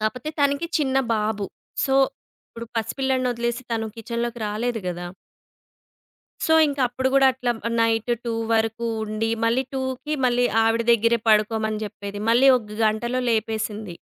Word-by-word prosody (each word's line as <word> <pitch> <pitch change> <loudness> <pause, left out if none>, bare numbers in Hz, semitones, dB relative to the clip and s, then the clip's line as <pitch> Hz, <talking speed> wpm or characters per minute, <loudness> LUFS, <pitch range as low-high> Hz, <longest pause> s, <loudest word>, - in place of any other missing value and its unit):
కాకపోతే 245 +6 -2
తనకి 285 +3 +2
చిన్న 265 -3 0 0.2
బాబు. 210 -1 -1 0.4
సో, 270 - +1 0.5
ఇప్పుడు 230 0 -9
పసిపిల్లాడిని 260 +3 0
ఒదిలేసి 235 +1 -2
తను 225 -1 -1
కిచెన్‌లోకి 235 +1 -4
రాలేదు 225 +2 -2
గదా! 175 0 -4 1.4
సో, 320 - +3
ఇంక 285 -1 -3
అప్పుడు 260 +2 -1
కూడా 270 -1 +6
అట్లా 250 -1 -1 0.3
నైట్ 225 +1 +1
2 235 - -2 0.2
వరకు 225 +1 0 0.2
ఉండి, 220 +1 -2
మళ్ళీ 235 +3 +2
2కి 260 +3 -3
మళ్ళీ 245 0 +2 0.2
ఆవిడ 225 +1 +2
దగ్గరే 230 +1 +3
పడుకోమని 215 0 +2
చెప్పేది. 205 -1 -7
మళ్ళీ 255 +4 +5
ఒక 215 -3 -13
గంటలో 235 +4 0
లేపేసింది. 220 -3 -2
230 Hz, 135 wpm, -23 LUFS, 220-250 Hz, 1.4 s, కూడా